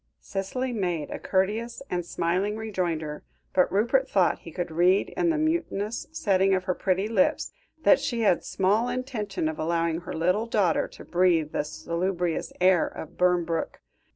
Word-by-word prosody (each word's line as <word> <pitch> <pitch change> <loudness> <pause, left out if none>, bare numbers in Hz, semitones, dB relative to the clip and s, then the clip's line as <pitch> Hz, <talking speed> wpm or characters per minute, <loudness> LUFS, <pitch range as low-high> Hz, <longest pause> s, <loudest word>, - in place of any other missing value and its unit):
Cicely 245 +7 -3
made 175 -8 -2
a - - -4
courteous 215 +7 -1
and 175 -1 -2
smiling 180 +5 -1
rejoinder, 170 -8 -3 0.3
but 180 - +3
Rupert 245 +7 +2
thought 190 -3 +2
he 165 - -11
could 175 +1 -4
read, 180 +4 +3
in 350 -1 0
the 325 - +1
mutinous 305 -9 -1
setting 195 -11 +2
of 185 - -1
her 185 -1 0
pretty 190 +2 0
lips, 280 +7 +1 0.3
that - - +6
she 235 -3 -2
had 200 -6 +3
small 210 +6 +1
intention 240 -9 -3
of 155 - -4
allowing 165 0 0
her - - -7
little 180 +8 +1
daughter 200 -8 +2
to - - -13
breathe 170 -4 +2
the - - -1
salubrious 170 +3 -2
air 180 -2 +4
of 160 - -8
Burnbrooke. 175 -2 0
185 Hz, 160 wpm, -26 LUFS, 170-220 Hz, 0.3 s, that